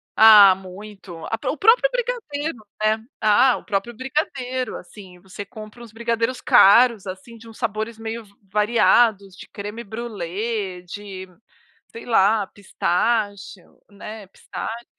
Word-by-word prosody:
Ah 210 -3 +9
muito, 190 -1 -11
a 225 - -2
o 300 - -6
próprio 460 - +4
brigadeiro, 450 - -3 0.2
né, 215 +1 +1 0.2
ah, 240 +4 +4
o - - -12
próprio 210 +3 -3
brigadeiro 260 -1 -3
assim, 185 -4 -14
você 195 +2 -9
compra 215 +2 -12
uns 235 - -12
brigadeiros 230 +2 -2
caros 235 -2 +5
assim 190 +5 -9
de 230 0 -15
uns 225 - -14
sabores 220 0 -3
meio 225 0 -6
v 200 - -24 0.2
variados 210 -2 +2
de - - -12
Crème 210 +3 -8
brûlée, 205 -3 -5
de 190 0 -9 0.6
sei 230 - -10
lá, 210 -2 +3
pistache, 205 0 -2 0.3
né, 210 0 -10
pistache. 230 +4 -8
220 Hz, 130 wpm, -22 LUFS, 200-235 Hz, 0.6 s, Ah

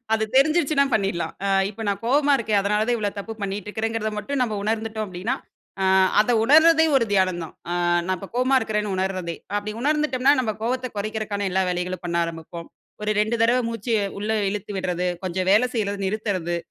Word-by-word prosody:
அது 220 0 +1
தெரிஞ்சிடுச்சுனா 295 0 +4
பண்ணிட்லாம். 195 -5 -1
ஆ - - 0 0.2
இப்ப 215 - -13
நான் 200 - -1
கோவமா 285 +4 +3
இருக்கேன். 215 -3 +1
அதுனால 210 +2 +1
தான் 240 - +2
இவ்ளோ 205 -1 -1
தப்பு 210 +3 -5
பண்ணிட்டுருக்கிறேங்கிறத 215 +2 -3
மட்டும் 265 +6 -3
நம்ம 220 -4 -1
உணர்ந்துட்டோம் 220 0 -2
அப்டின்னா, 190 +7 -3 0.5
ஆ 190 - +1 0.4
அத 215 - +2
உணர்தே 320 +5 +6
ஒரு 250 - +3
தியானம் 185 -3 +2
தான். 160 - -11 0.2
ஆ - - -1 0.3
நான் 185 0 0
இப்ப 195 - -9
கோவமா 255 +2 +2
இருக்கிறேன்னு 210 -2 -2
உணரதே. 185 -3 -2 0.2
அப்டி 210 +1 -5
உணர்ந்துட்டோம்னா 285 -2 +2
நம்ம 225 -4 -1
கோவத்த 255 +2 -1
குறைக்கிறதுக்கான 215 -1 -3
எல்லா 190 +1 +1
வேலைகளும் 180 +1 -3
பண்ண 170 -1 -2
ஆரம்பிப்போம். 165 0 -7 0.3
ஒரு 210 - -1
2 220 +2 +1
தடவை 240 +2 +4
மூச்ச, 230 0 -7 0.3
உள்ள 210 +2 -3 0.2
இழுத்து 210 +1 -5
விட்றது. 180 -1 -1 0.2
கொஞ்சம் 185 +1 -2
வேலை 215 +5 +5
செய்றத 205 -3 -1
நிறுத்துறது. 190 -4 -2
210 Hz, 175 wpm, -23 LUFS, 190-240 Hz, 0.5 s, உணர்தே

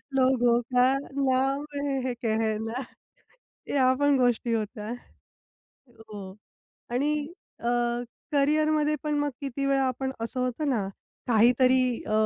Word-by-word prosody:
लोगों 250 -2 +3 0.2
का 250 +1 +5
नाम 275 0 0 0.4
है 255 - -1
कहना. 220 +1 -1 0.9
या 260 -2 +4
पण 285 -1 +4
गोष्टी 245 -1 +1
होत्या. 215 0 -3 1.0
हो. 210 -4 -10 0.6
आणि 290 +4 0 0.3
अ, - - -5 0.7
करियरमध्ये 305 +1 +2
पण 300 -1 -1
मग 290 0 0
किती 275 0 -3
वेळा 275 0 +2
आपण 265 +1 -2
असं 230 +3 -3
होतं 255 +4 -1
ना 210 -7 0 0.4
काहीतरी 250 +3 +5 0.3
अ, - - -3
255 Hz, 115 wpm, -27 LUFS, 230-280 Hz, 1.0 s, का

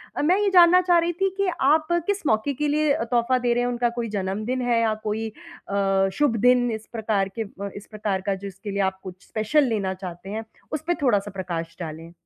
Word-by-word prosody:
अ, - - -1
मैं 350 +6 +3
ये 415 -1 +2
जानना 360 0 +7
चाह 355 -1 +4
रही 340 +1 0
थी 390 - +4
कि 395 - +1
आप 310 +3 +4 0.2
किस 405 -3 -1
मौके 220 +6 +1
के 295 +3 -1
लिए 300 0 +2
अ, - - -1
तोहफ़ा 240 +2 +1
दे 245 -1 +1
रहे 245 +1 +1
हैं, 245 - 0
उनका 240 0 +1
कोई 230 - -2
जन्मदिन 210 +5 -2
है 240 -1 +2
या 220 -1 +2
कोई 220 +1 -2 0.4
अ, 195 -1 +2
शुभ 290 -2 +2
दिन, 245 -1 +5
इस 220 0 -5
प्रकार 210 -3 0
के 225 - -1 0.3
इस 205 - -9
प्रकार 205 -3 -2
का, 195 +1 -1
जिसके 195 +1 -7
लिए 200 0 -1
आप 190 0 -19
कुछ 185 0 -10
स्पेशल 220 +8 +2
लेना 195 -4 -1
चाहते 185 0 -8
हैं? 220 +2 -4 0.3
उसपे 315 +3 0
थोड़ा-सा 205 -7 +2
प्रकाश 170 -3 -4
डालें। 165 0 -7
225 Hz, 220 wpm, -24 LUFS, 195-280 Hz, 0.4 s, जानना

